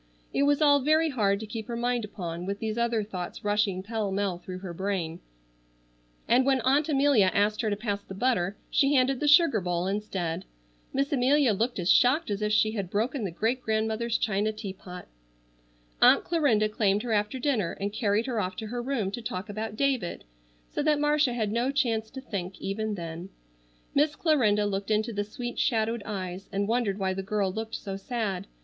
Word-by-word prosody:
It 280 - +2
was 290 +1 +3
all 285 -1 +6
very 310 +4 +3
hard 200 -6 +1
to - - -5
keep 220 +1 -6
her 235 - -4
mind 240 0 0
upon, 180 -4 -5
with 200 0 -2
these 215 0 -3
other 235 -2 +1
thoughts 185 -4 -6
rushing 205 -2 +1
pell 215 -1 -2
mell 195 -2 -1
through 185 0 -7
her 185 -2 -7
brain; 180 -3 -2 1.1
and 250 +2 +4
when 265 0 +3
Aunt 280 +5 +2
Amelia 275 -9 +4
asked 210 +1 +2
her 220 - 0
to 205 - 0
pass 205 -1 -3
the 190 - -10
butter, 205 -4 0
she 280 +1 +3
handed 260 0 +3
the 295 - 0
sugar 295 - +5
bowl 175 0 -1
instead. 190 -4 -2 0.5
Miss 275 +2 0
Amelia 270 -1 +3
looked 230 +5 -1
as 175 -1 +2
shocked 260 - +4
as 200 +1 -2
if 210 0 0
she 215 0 +3
had 200 -5 -4
broken 230 +6 -1
the - - -2
great 225 +9 -1
grandmother's 220 +1 0
china 210 0 0
teapot. 190 -4 -8 0.9
Aunt - - +7
Clarinda 280 -11 +2
claimed 210 -1 +1
her 240 - -3
after 210 +4 0
dinner 245 - 0
and 200 +1 -4
carried 215 0 +1
her 240 -4 -1
off 185 -2 -2
to 220 - -5
her 240 +1 -3
room 240 -6 -1
to 240 - -5
talk 200 -2 -5
about 215 +1 -4
David, 260 -10 0 0.5
so - - -2
that 300 0 +2
Marcia 295 -3 +2
had 220 -4 -1
no 240 +4 +1
chance 230 -6 0
to 265 - -8
think 190 -7 -5
even 215 +2 -2
then. 170 +1 -6 0.6
Miss 295 +1 +2
Clarinda 225 -12 +2
looked 200 0 -2
into 220 +2 +1
the 205 0 -1
sweet 240 +4 -6
shadowed 225 -3 +1
eyes 190 -2 -5
and 200 0 -1
wondered 225 -4 0
why 190 -2 0
the 195 - -3
girl 200 -1 -1
looked 220 +1 -4
so 195 -1 -5
sad. 200 -2 -3
215 Hz, 195 wpm, -27 LUFS, 195-245 Hz, 1.1 s, Aunt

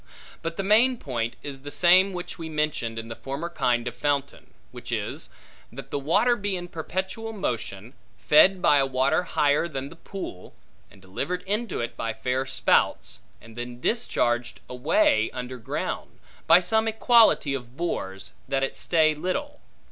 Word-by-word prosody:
But 165 0 -4
the 195 - -1
main 230 +6 +4
point 120 - -3
is 135 -2 -7
the 145 - -7
same 185 +5 +5
which 180 -1 -6
we 165 -1 -5
mentioned 150 -7 -1
in 115 0 -5
the 115 - -6
former 140 +5 -5
kind 120 -6 0
of 120 - -4
fountain; 140 0 -2 0.2
which - - -9
is, - - -3 0.4
that 135 +2 -10
the 145 - -1
water 205 - +3
be 205 -3 -2
in 175 -1 -6
perpetual 190 +7 -4
motion, 120 - -4 0.2
fed 185 +5 +5
by 145 - +6
a 135 - +3
water 135 +5 +2
higher 150 -2 +1
than 135 -3 -5
the 165 - -12
pool, 165 - -8 0.3
and 95 - -19
delivered 175 - -4
into 210 - -2
it 120 - -4
by 115 -1 -3
fair 130 +1 -1
spouts, - - +1 0.2
and 115 -1 -15
then 120 0 -6
discharged 120 - 0
away 290 - +2
under 125 0 -5
ground, 115 - -4 0.3
by 165 +2 +8
some 220 +5 +1
equality 225 - +4
of 125 -1 -7
bores, 95 - -4
that 135 0 0
it 135 - -2
stay 160 -2 +3
little. 285 - -3
150 Hz, 165 wpm, -25 LUFS, 125-190 Hz, 0.4 s, by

